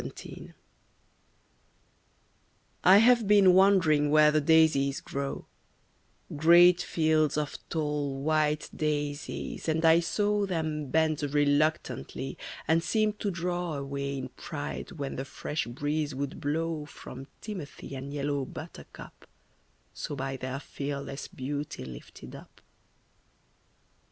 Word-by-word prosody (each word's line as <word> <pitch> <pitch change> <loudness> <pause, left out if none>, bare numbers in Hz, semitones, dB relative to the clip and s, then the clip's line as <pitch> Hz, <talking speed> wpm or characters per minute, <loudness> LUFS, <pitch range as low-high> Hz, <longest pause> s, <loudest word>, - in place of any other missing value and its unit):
Content. - - -9 2.3
I 185 +2 +8
have 235 0 +5
been 200 -3 +6
wandering 180 -6 +4
where 150 0 +6
the 155 0 +2
daisies 150 -3 +3
grow, 140 0 -5 0.9
Great 175 +3 +6
fields 155 -2 +1
of 150 -1 -2
tall, 150 -3 -2
white 155 -1 +1
daisies, 145 +1 -3
and 160 +1 +1
I 165 +1 +7
saw 205 +3 0
Them 155 -5 -2
bend 160 0 +1
reluctantly, 145 -1 0 0.3
and 165 +2 +3
seem 215 +1 +1
to 205 - -1
draw 175 -2 -2
Away 140 0 -4
in 130 -1 -5
pride 145 +3 -6
when 140 -5 -5
the 135 - -3
fresh 150 -1 -4
breeze 145 +4 -2
would 140 +1 -4
blow 155 +1 -2
From 135 -2 -10
timothy 185 -9 -8
and 135 +1 -6
yellow 145 -1 -1
buttercup, - - -11 0.7
So 145 - -5
by 135 0 -3
their 130 +1 -4
fearless 140 -1 -5
beauty 140 - -5
lifted 65 -1 -11
up. - - -13
150 Hz, 115 wpm, -28 LUFS, 140-165 Hz, 2.3 s, I